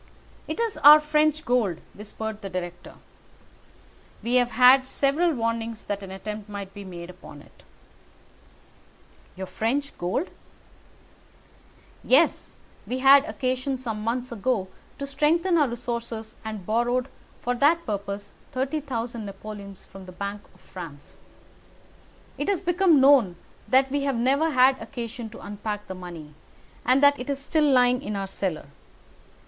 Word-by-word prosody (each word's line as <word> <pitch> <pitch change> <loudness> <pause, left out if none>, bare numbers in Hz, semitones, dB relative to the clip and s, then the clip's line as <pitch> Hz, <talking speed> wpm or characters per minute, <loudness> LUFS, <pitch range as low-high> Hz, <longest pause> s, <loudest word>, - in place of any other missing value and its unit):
"It - - -4
is 460 -3 -1
our 300 +2 +9
French 305 0 +1
gold," 230 -9 +1 0.2
whispered 215 +1 -7
the 195 - -6
director. 175 -1 -6 1.3
"We 235 - -2
have 245 -1 +3
had 255 +3 +6
several 285 +6 +1
warnings 230 -2 -3
that 205 0 -3
an 195 - -8
attempt 210 +2 -7
might 200 -1 -7
be 205 - -8
made 175 -2 -8
upon 145 -5 -13
it." - - -22 1.7
"Your 190 - -5
French 270 +9 -2
gold?" 185 - -2 1.7
"Yes. 290 +6 +2 0.3
We 250 - -2
had 275 +2 +7
occasion 260 -2 -2
some 225 -4 -4
months 245 +3 -2
ago 215 -3 -1 0.3
to 280 - -4
strengthen 330 +6 +2
our 300 -4 +4
resources 235 -2 -5
and 215 -4 -6
borrowed 240 +4 +1 0.3
for 245 - -1
that 305 +7 +3
purpose 200 -1 -5 0.2
30,000 255 -4 -3
napoleons 200 -1 -9
from 190 -1 -13
the - - -9
Bank 200 +2 -5
of - - -23
France. 165 -6 -11 1.2
It - - -2
has 385 -2 0
become 350 -3 +4
known 265 -9 +5 0.3
that 265 0 +3
we 285 0 0
have 275 -2 0
never 275 +7 +2
had 260 -2 +4
occasion 235 -2 -6
to 220 - -12
unpack 210 0 -5
the - - -6
money, 170 -5 -9 0.5
and 255 +3 +3
that 285 0 +6
it 250 - -6
is 280 - 0
still 295 +1 +1
lying 250 0 +4
in 210 -6 -4
our 195 -1 -2
cellar. 185 -6 -3
240 Hz, 140 wpm, -25 LUFS, 205-275 Hz, 1.7 s, our